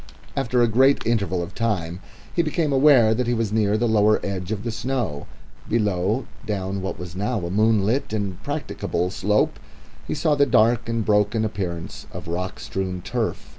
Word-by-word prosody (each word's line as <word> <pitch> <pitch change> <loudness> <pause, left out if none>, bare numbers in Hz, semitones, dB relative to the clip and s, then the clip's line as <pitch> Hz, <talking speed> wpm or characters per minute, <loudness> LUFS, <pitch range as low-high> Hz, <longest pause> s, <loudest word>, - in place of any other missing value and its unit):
After 125 -2 +2
a - - +4
great 130 +5 +3
interval 100 -6 0
of 85 - -8
time 95 -7 -2 0.4
he 170 - +4
became 155 -2 0
aware 130 -5 +6
that 120 +2 -1
he 120 - +1
was 110 -2 -1
near 105 -1 +2
the 120 +2 +1
lower 110 -1 +4
edge 95 -1 -4
of 105 -1 -3
the 115 - -2
snow. 110 - -3 0.4
Below, 105 +1 +1 0.2
down 100 -2 -3
what 95 - -4
was 90 -1 -8
now 105 0 -1
a 85 - -4
moonlit 110 +4 +2
and 100 -4 -3
practicable 90 +1 -2
slope, 105 +2 +1 0.5
he - - -2
saw 150 +1 +2
the 140 -1 +3
dark 120 -1 +3
and 115 -2 -1
broken 105 +1 +2
appearance 90 -6 -5
of - - -8
rock 90 +2 -3
strewn 95 -2 -4
turf. 110 +3 -3
110 Hz, 175 wpm, -23 LUFS, 95-120 Hz, 0.5 s, aware